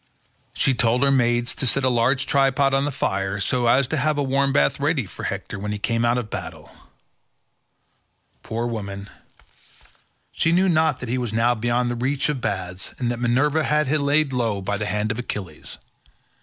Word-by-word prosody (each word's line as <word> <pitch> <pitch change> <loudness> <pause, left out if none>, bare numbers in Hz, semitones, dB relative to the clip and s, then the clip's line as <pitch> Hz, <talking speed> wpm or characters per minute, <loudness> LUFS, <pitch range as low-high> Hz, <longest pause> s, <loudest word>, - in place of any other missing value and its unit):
She 135 - +2
told 120 +2 +2
her 140 - +4
maids 120 -2 +2
to 130 - -1
set 135 +3 +1
a - - +3
large 125 +2 +2
tripod 135 0 +2
on 135 +1 +2
the 145 - -1
fire, 95 -6 -2
so 120 +4 +1
as 130 +3 +4
to 160 - -1
have 150 +2 +1
a 145 - +1
warm 140 +1 +1
bath 70 - +2
ready - - 0
for - - -8
Hector - - -4
when 105 +1 -4
he 105 - -2
came 115 +2 -1
out 120 +1 +2
of 115 -4 -4
battle; 80 -4 -7 1.7
poor 115 +2 -3
woman, 100 -3 -5 1.2
she 165 - +1
knew 185 +3 +3
not 160 -5 +2
that 125 - -5
he 130 +2 0
was 120 -3 -3
now 115 +2 +3
beyond 120 +1 0
the - - -2
reach 130 +5 -1
of 140 -4 -2
baths, 95 -3 -3
and 120 -2 -1
that 120 - -4
Minerva 140 +6 +2
had 150 -2 +1
laid 145 -1 +2
him 125 - -1
low 110 -4 0
by 100 +2 -2
the 105 - -2
hands 105 +2 -1
of 115 - -4
Achilles. 95 -10 -6
120 Hz, 195 wpm, -23 LUFS, 110-135 Hz, 1.7 s, her